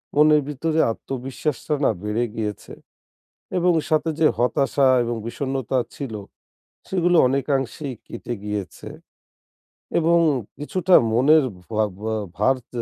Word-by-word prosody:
মনের 150 Hz, 0 st, +5 dB
ভিতরে 160 Hz, +3 st, -1 dB
আত্মবিশ্বাসটা 135 Hz, +4 st, -4 dB
না -, -, +4 dB
বেড়ে 105 Hz, +3 st, 0 dB
গিয়েছে। 105 Hz, -2 st, -5 dB, 0.8 s
এবং 175 Hz, 0 st, +3 dB, 0.2 s
সাথে 155 Hz, +1 st, +2 dB
যে 160 Hz, -, +5 dB
হতাশা 135 Hz, +2 st, +2 dB, 0.2 s
এবং 120 Hz, 0 st, -2 dB
বিষণ্ণতা 130 Hz, +1 st, -2 dB, 0.2 s
ছিল 135 Hz, -6 st, -6 dB, 0.8 s
সেগুলো 175 Hz, -2 st, +2 dB
অনেকাংশেই 135 Hz, 0 st, -1 dB
কেটে 120 Hz, -, -6 dB
গিয়েছে। 105 Hz, -4 st, -5 dB, 1.1 s
এবং 170 Hz, +1 st, +3 dB, 0.4 s
কিছুটা 180 Hz, +4 st, +2 dB, 0.2 s
মনের 140 Hz, +5 st, +5 dB, 0.3 s
ভা 110 Hz, 0 st, +2 dB, 0.2 s
ভা 110 Hz, +1 st, -3 dB, 0.2 s
ভার 130 Hz, +6 st, +3 dB, 0.2 s
তে 120 Hz, -1 st, -3 dB
135 Hz, 110 wpm, -22 LUFS, 120-155 Hz, 1.1 s, মনের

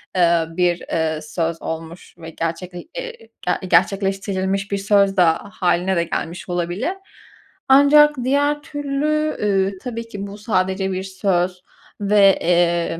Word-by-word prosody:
eee, 170 Hz, -2 st, +3 dB
bir, 175 Hz, -1 st, +2 dB
eee, 160 Hz, -1 st, -2 dB
söz 165 Hz, +2 st, -3 dB
olmuş 160 Hz, +2 st, -7 dB
ve 165 Hz, -1 st, -9 dB
gerçekle 170 Hz, +2 st, -5 dB
e -, -, -5 dB, 0.3 s
ge 185 Hz, -, -1 dB
gerçekleştirilmiş 195 Hz, +2 st, 0 dB
bir 200 Hz, -, 0 dB
söz 200 Hz, 0 st, +2 dB
da 165 Hz, -3 st, +4 dB
hâline 185 Hz, 0 st, 0 dB
de 170 Hz, -, +2 dB
gelmiş 170 Hz, +2 st, -5 dB
olabilir. 175 Hz, -, -2 dB, 0.8 s
Ancak 295 Hz, +2 st, +6 dB
diğer 285 Hz, +3 st, +1 dB
türlü, 295 Hz, +2 st, -1 dB
ııı, 195 Hz, -1 st, +2 dB
tabii 230 Hz, -2 st, -5 dB
ki 200 Hz, -2 st, -6 dB
bu 200 Hz, +1 st, -9 dB
sadece 190 Hz, -2 st, -1 dB
bir 185 Hz, 0 st, -3 dB
söz 185 Hz, -1 st, -1 dB, 0.4 s
ve, 200 Hz, -1 st, +4 dB
eee, 170 Hz, -1 st, +1 dB
190 Hz, 135 wpm, -20 LUFS, 175-210 Hz, 0.8 s, Ancak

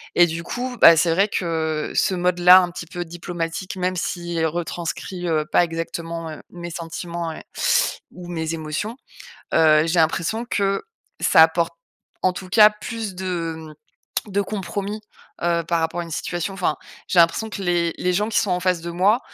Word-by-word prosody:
et 175 Hz, -, +6 dB
du 165 Hz, +1 st, -4 dB
coup, 245 Hz, +4 st, -4 dB
bah, 165 Hz, -, +9 dB
c'est 165 Hz, +1 st, +3 dB
vrai 195 Hz, +5 st, +3 dB
que, 160 Hz, -4 st, -2 dB
ce -, -, +2 dB
mode-là 180 Hz, 0 st, +6 dB
un 180 Hz, -, 0 dB
petit 170 Hz, -1 st, -7 dB
peu 175 Hz, +2 st, -5 dB
diplomatique, 175 Hz, +1 st, -5 dB
même 185 Hz, 0 st, -1 dB
s'il 170 Hz, -1 st, -2 dB
retranscrit, 175 Hz, +2 st, -4 dB
heu, 155 Hz, -2 st, +1 dB
pas -, -, +5 dB
exactement, 165 Hz, 0 st, -4 dB
heu, 155 Hz, -, -8 dB
mes 175 Hz, -1 st, -7 dB
sentiments 170 Hz, 0 st, -5 dB
et -, -, -8 dB, 0.7 s
ou 180 Hz, 0 st, -10 dB
mes 165 Hz, -2 st, -3 dB
émotions, 160 Hz, -, -4 dB, 0.6 s
heu, 155 Hz, 0 st, +5 dB
j'ai 170 Hz, +1 st, +1 dB
l'impression 170 Hz, +8 st, 0 dB
que, 195 Hz, -1 st, 0 dB, 0.4 s
ça 160 Hz, -, +6 dB
apporte 165 Hz, +1 st, +2 dB, 0.5 s
en 185 Hz, -, +3 dB
tout 185 Hz, +1 st, -8 dB
cas 210 Hz, +3 st, +7 dB
plus 215 Hz, -1 st, -6 dB
de, 180 Hz, -3 st, -3 dB
mmh, 155 Hz, +6 st, -9 dB
de 200 Hz, -, +2 dB
compromis, 200 Hz, +1 st, -4 dB, 0.4 s
heu, 170 Hz, -1 st, +1 dB
par 170 Hz, -1 st, +1 dB
rapport 160 Hz, +2 st, -1 dB
à -, -, -2 dB
une 165 Hz, -, -11 dB
situation. 175 Hz, +4 st, -3 dB
Enfin, 180 Hz, -5 st, 0 dB, 0.3 s
j'ai 180 Hz, -, +1 dB
l'impression 170 Hz, +6 st, +2 dB
que 200 Hz, -, -6 dB
les 170 Hz, -2 st, +1 dB
les 180 Hz, 0 st, 0 dB
gens 210 Hz, +4 st, +1 dB
qui 210 Hz, -, +2 dB
sont 205 Hz, -, -1 dB
en 180 Hz, 0 st, +1 dB
face 180 Hz, -2 st, +1 dB
de 170 Hz, -, -5 dB
moi, 195 Hz, +7 st, +3 dB
175 Hz, 185 wpm, -22 LUFS, 165-185 Hz, 0.7 s, bah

